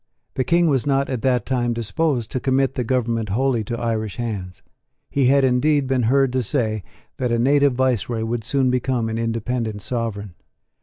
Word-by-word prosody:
The 130 - 0
King 170 +6 +3
was 140 -4 +1
not 135 -1 +1
at 125 -4 -2
that 125 -2 +1
time 120 -2 0
disposed 120 +1 -1
to 130 - -1
commit 135 +1 +1
the 130 - -2
government 115 -3 -1
wholly 120 +2 +1
to 120 +2 -4
Irish 110 -3 -2
hands. 100 -7 -5 0.5
He 135 -3 +2
had 140 +1 +4
indeed 135 +3 +2
been 130 -3 +1
heard 135 -1 +3
to 130 - +1
say 110 -3 -1 0.4
that 125 -2 -1
a 120 - +2
native 140 +3 +3
viceroy 120 -3 0
would 115 0 -2
soon 130 +2 +1
become 125 -2 0
an 110 0 -3
independent 115 -2 -2
sovereign. 110 -6 -3
125 Hz, 185 wpm, -22 LUFS, 115-135 Hz, 0.5 s, had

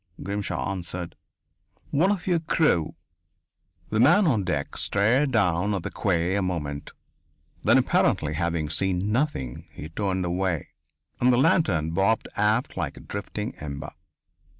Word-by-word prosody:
Grimshaw 100 0 -2
answered: 90 -2 -5 0.8
"One 160 +7 +3
of 195 -5 -2
your 175 -3 +2
crew." 155 - +1 0.9
The 110 - 0
man 170 - +6
on 120 - +2
deck 75 -5 -2
stared 125 +8 +2
down 100 -3 +2
at 95 - -3
the - - -4
quay 90 -2 0
a 100 - +1
moment. 75 -6 -3 0.7
Then, - - +5
apparently 75 0 +2
having 85 -1 -1
seen 95 +4 -1
nothing, 115 - -2
he 75 - -8
turned 95 +1 -1
away, 90 -2 -1 0.5
and 125 +1 +4
the 120 - +3
lantern 125 - +2
bobbed 100 +6 +1
aft 105 +4 +1
like - - -3
a - - -10
drifting 105 +3 -5
ember. 70 -2 -6
95 Hz, 140 wpm, -25 LUFS, 85-120 Hz, 0.9 s, man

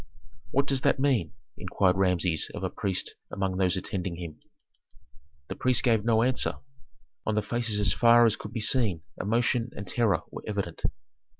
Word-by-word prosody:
"What 140 +3 +2
does 135 -2 0
that 135 - +2
mean?" 130 - +1 0.3
inquired 95 -2 +1
Rameses 90 -3 +1
of - - -6
a - - -1
priest 95 -2 -2 0.2
among 95 -1 -2
those 95 -1 +2
attending 95 -1 -3
him. 85 -3 -8 1.1
The - - -5
priest 130 -2 +1
gave 115 -5 +3
no 115 -1 +3
answer; 125 +1 +1 0.7
on 110 - -1
the 105 - +1
faces 115 -3 -1
as 100 -2 +2
far 120 0 +6
as 110 - +3
could 105 - -9
be 115 - -3
seen 105 -8 +1 0.2
emotion 115 +3 +1
and 100 - -6
terror 105 -4 +1
were - - -7
evident. 100 -5 -3
105 Hz, 170 wpm, -28 LUFS, 95-120 Hz, 1.1 s, far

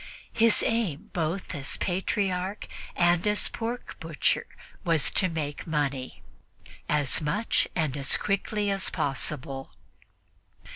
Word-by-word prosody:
His 230 -1 +5
aim 215 -5 0
both 170 +2 -2
as 140 -1 -4
Patriarch 190 +1 -1 0.3
and 175 +2 +3
as 210 0 +2
pork 235 +2 -4
butcher 160 -2 0 0.4
was 165 -5 +3
to 185 - +3
make 150 -3 -4
money 140 -4 -2 0.7
as 150 -1 +2
much 155 +10 +1
and 155 -6 0
as 135 -1 +3
quickly 205 +1 0
as 195 -1 +1
possible. 135 -1 -2
170 Hz, 110 wpm, -28 LUFS, 145-200 Hz, 0.7 s, His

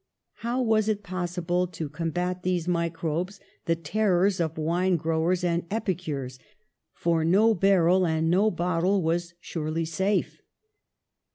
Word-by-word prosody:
How 240 +2 -2
was 220 -2 +2
it 210 -1 -1
possible 180 -1 -1
to 165 -3 -5
combat 175 +4 -3
these 180 -2 -1
mi 170 -1 +1
80 - - -1
PASTEUR 165 0 -19
crobes, 175 +5 -2 0.3
the 165 - +2
terrors 185 +3 +1
of 160 -2 -1
wine 175 +4 +1
growers 165 +3 0
and 170 -1 0
epicures, 160 - -3 0.5
for 165 -1 0
no 205 +7 +4
barrel 185 -2 +3
and 160 0 0
no 200 +5 +4
bottle 180 +1 0
was 170 +1 -1
surely 160 0 -3
safe? 190 +5 -1
175 Hz, 145 wpm, -26 LUFS, 165-190 Hz, 0.5 s, no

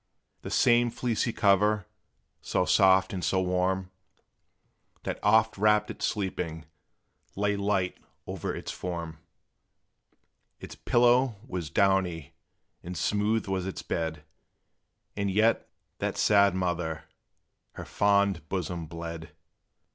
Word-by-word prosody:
The - - -7
same 120 0 +4
fleecy 115 -1 -1
cover, 105 -1 +2 0.6
so 90 - 0
soft 95 -1 +4
and 90 -2 -4
so 90 +4 +1
warm, 90 0 0 1.1
That - - -4
oft 110 0 +3
wrapped 105 0 +3
it - - -12
sleeping, 90 -5 -3 0.7
lay 105 +1 0
light 100 -2 -1 0.3
o'er - - -4
its - - -6
form; 85 -3 -6 1.4
Its - - -9
pillow 120 0 +3
was 90 - -4
downy, 95 -5 +1 0.5
and 90 0 -7
smooth 105 +6 0
was 95 -1 -2
its 95 - -6
bed, 80 -2 -3 0.9
And 100 -1 -1
yet, 110 +4 +2 0.3
that - - -2
sad 100 -2 +4
mother! 85 -3 -2 0.7
her - - -8
fond 100 -5 +1
bosom 90 -3 -3
bled. 85 -1 -8
95 Hz, 110 wpm, -28 LUFS, 85-105 Hz, 1.4 s, same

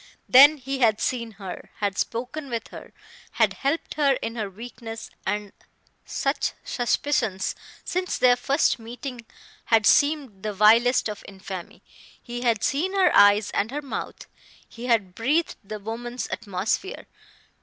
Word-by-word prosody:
Then 285 +4 +8
he 270 0 -4
had 220 -4 +3
seen 235 -3 -2
her, 195 -2 -8
had 200 -2 -2
spoken 255 +8 -3
with 230 -2 -4
her, - - -11 0.4
had - - +3
helped 280 +4 -2
her 285 -2 +3
in 230 -3 -4
her 215 -4 -3
weakness; 225 +2 -9 0.2
and 205 0 -2 0.5
such 275 +1 -1
suspicions, 240 -5 0 0.3
since 365 +1 -2
their 250 -1 +5
first 270 +2 +1
meeting, 240 +1 -8 0.4
had 225 -2 +3
seemed 285 -9 +3
the 215 0 -3
vilest 230 +6 +5
of 210 -1 -7
infamy. 190 -2 -9 0.4
He 240 0 -7
had 230 -4 +1
seen 350 +8 0
her 380 -2 +4
eyes 205 +1 +6
and 210 - 0
her 295 +3 -4
mouth; 275 - -6 0.4
he 240 +2 -8
had 215 -7 +1
breathed 295 - 0
the 215 +2 -6
woman's 235 +4 -5
atmosphere. 205 - -3
235 Hz, 145 wpm, -25 LUFS, 210-270 Hz, 0.5 s, Then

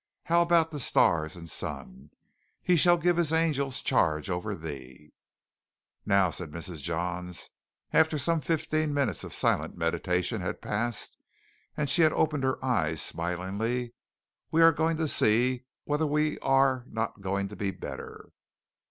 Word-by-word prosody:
How 170 0 +3
about 170 -1 +3
the 150 - -4
stars 80 - +2
and 85 -1 -10
sun? 65 -2 -6 0.5
"He 180 - +3
shall 175 +2 +5
give 175 +1 +1
his 170 -3 +3
angels 145 -5 +1
charge 75 +3 +1
over 100 +4 -3
thee." 75 -3 -9 0.9
"Now," 100 -3 +3
said 90 -2 -5
Mrs. 80 0 -6
Johns, 90 +2 -4 0.4
after 160 -1 +4
some 160 +3 +1
fifteen 155 -2 -1
minutes 130 - 0
of - - -8
silent - - 0
meditation 90 0 -1
had - - -4
passed 115 +1 -3 0.6
and 150 - 0
she 165 +4 +3
opened 155 -2 +2
her 130 0 +1
eyes 80 - 0
smilingly 100 - -2 0.6
"we 165 +1 +4
are 165 - +8
going 160 +2 0
to 160 -1 0
see 125 +1 +2 0.2
whether 150 +1 0
we 150 +1 0
are 135 -1 +2
not 110 -2 -3
going 100 +1 -1
to 105 - -9
be 100 0 -2
better. - - -8
120 Hz, 145 wpm, -28 LUFS, -, 0.9 s, are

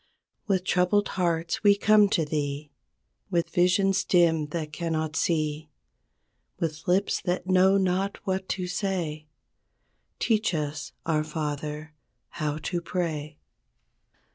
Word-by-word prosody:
With 190 -3 +1
troubled 185 +3 +2
hearts 170 -2 -1
we 205 -1 +6
come 210 -1 +5
to 165 -5 +1
Thee 145 -1 -3 0.6
With 170 -2 0
visions 195 +2 +3
dim 165 -5 +3
that 155 -1 -5
cannot 160 -1 -2
see. 155 -2 0 0.9
With 155 +1 -3
lips 190 +3 +2
that 180 0 -2
know 190 +1 +4
not 190 +1 0
what 190 0 -2
to 185 - -2
say; 180 -5 -3 0.9
Teach 215 -5 +1
us, 145 -2 -3
our 155 -2 +1
Father, 150 0 -4 0.4
how 150 -2 -3
to 175 -2 -2
pray. 155 -4 -3
170 Hz, 115 wpm, -27 LUFS, 155-190 Hz, 0.9 s, we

